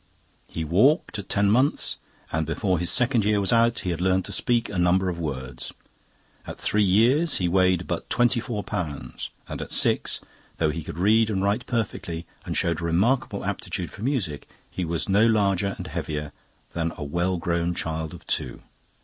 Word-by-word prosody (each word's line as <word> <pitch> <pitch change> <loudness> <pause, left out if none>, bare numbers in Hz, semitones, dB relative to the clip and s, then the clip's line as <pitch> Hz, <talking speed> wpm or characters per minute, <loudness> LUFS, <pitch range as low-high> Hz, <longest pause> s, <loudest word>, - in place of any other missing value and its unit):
He 80 - -4
walked 105 - +3
at 100 - -8
ten 100 0 +3
months, 130 +6 +2 0.3
and 80 -1 -1
before 90 +1 0
his 90 +1 -1
second 125 +1 +3
year 105 0 +2
was 100 +1 +1
out 115 0 +3
he 90 - -2
had 85 0 -3
learnt 95 0 +2
to - - -5
speak 120 -2 +2
a 95 - -3
number 90 +2 +3
of 85 -1 -4
words. 65 -6 -5 0.7
At - - -6
three 105 - +1
years 120 - +4
he 90 - 0
weighed 90 0 +3
but 85 - -4
twenty 120 0 +3
four 115 -3 -4
pounds, 85 -9 -5 0.2
and - - -5
at - - -6
six, - - +2 0.4
though 80 -2 +2
he 80 +1 -5
could 75 - -8
read 110 +4 +4
and 95 -3 0
write 100 +1 0
perfectly 100 -8 -3 0.2
and - - -2
showed 85 -1 0
a - - -5
remarkable 100 +11 +1
aptitude - - -3
for - - -11
music, 110 - -2 0.2
he 90 - -3
was 85 0 -2
no 105 +3 +4
larger 100 -3 +2
and - - -6
heavier 75 -1 -4 0.4
than 85 -1 -1
a - - -5
well 85 +5 0
grown 85 0 -1
child 80 0 -3
of 85 - -14
two. 60 - -3
95 Hz, 190 wpm, -25 LUFS, 85-110 Hz, 0.7 s, years